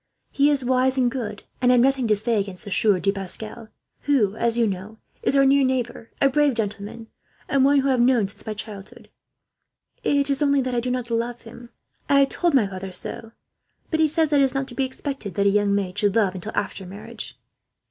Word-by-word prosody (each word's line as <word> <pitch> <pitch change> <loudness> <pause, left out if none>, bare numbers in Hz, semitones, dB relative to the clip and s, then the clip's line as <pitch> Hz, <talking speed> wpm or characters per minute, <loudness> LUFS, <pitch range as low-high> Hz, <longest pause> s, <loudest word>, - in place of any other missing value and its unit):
He 285 +1 +3
is 280 -3 0
wise 260 +1 +2
and 250 -2 +2
good, 215 -6 -5 0.2
and 250 0 +4
I - - +5
have - - +4
nothing 270 -2 +2
to 215 - +4
say 220 +1 0
against 195 +1 -5
the 200 - -7
Sieur 200 -1 +3
de 195 - +1
Pascal; 215 +4 -5 0.4
who, 225 -9 +2
as 230 +1 0
you 235 - +3
know, 205 +2 -5 0.2
is - - +1
our 275 0 +5
near 275 +1 +4
neighbour, 250 -3 -2
a 275 - +5
brave 290 -1 +2
gentleman, 210 +1 -4 0.4
and 275 -1 +2
one 285 +1 +4
whom 275 - -1
I - - +3
have 255 -2 +2
known 240 -4 +3
since 200 - -10
my 215 - -3
childhood. 210 -1 -10 0.9
It 280 0 +2
is 275 - -1
only 280 -1 +3
that 255 -1 -3
I 240 - +1
do 250 +2 -2
not 250 -1 -3
love 235 +1 -2
him. 235 +1 -12 0.4
I 280 0 +5
have 275 - +3
told 345 -4 +1
my 245 -6 +4
father 190 -1 -6
so, 225 +4 -4 0.6
but 315 - 0
he 315 - +5
says 320 0 +1
that 290 -2 +3
it - - +6
is 265 0 -3
not 270 0 -1
to - - -10
be 270 +1 0
expected 260 - -6
that 200 - +1
a - - +6
young 205 0 +2
maid 190 -3 -2
should 205 -2 +1
love, 205 -5 +2
until 190 +3 -7
after 200 -1 -3
marriage." 215 +4 -9
235 Hz, 235 wpm, -23 LUFS, 205-270 Hz, 0.9 s, it